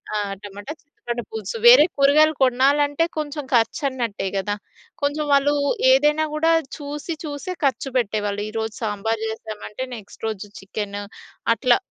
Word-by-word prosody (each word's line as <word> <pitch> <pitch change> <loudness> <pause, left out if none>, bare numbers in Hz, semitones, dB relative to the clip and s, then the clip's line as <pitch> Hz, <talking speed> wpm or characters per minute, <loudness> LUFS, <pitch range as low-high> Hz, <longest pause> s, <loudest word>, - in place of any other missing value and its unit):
ఆ! - - +2 0.3
టమాటా, 205 +8 -7
చింత 290 - -43
పండు 240 0 -2
పులుసు 220 0 -4
వేరే 260 +6 +10
కూరగాయలు 305 +3 +5
కొనాలంటే 285 +4 +3
కొంచెం 295 -1 -3
ఖర్చు 235 +7 +2
అన్నట్టే 230 -7 -3
కదా! 205 +1 -1 0.5
కొంచెం 295 +1 0
వాళ్ళు 280 +1 +4 0.4
ఏదైనా 300 +4 +4
గూడా 325 +2 +2 0.3
చూసి, 295 +3 -5
చూసే 300 +5 -5
ఖర్చు 270 0 +1
పెట్టేవాళ్ళు. 205 -3 -1
ఈరోజు 220 0 -3
సాంబారు 220 +1 -1
జేసామంటే 220 +2 -6
నెక్స్ట్ 215 0 -13
రోజు 210 -1 -4
చికెను. 205 +1 -5 0.5
అట్లా 245 0 +3
250 Hz, 135 wpm, -22 LUFS, 215-290 Hz, 0.5 s, వేరే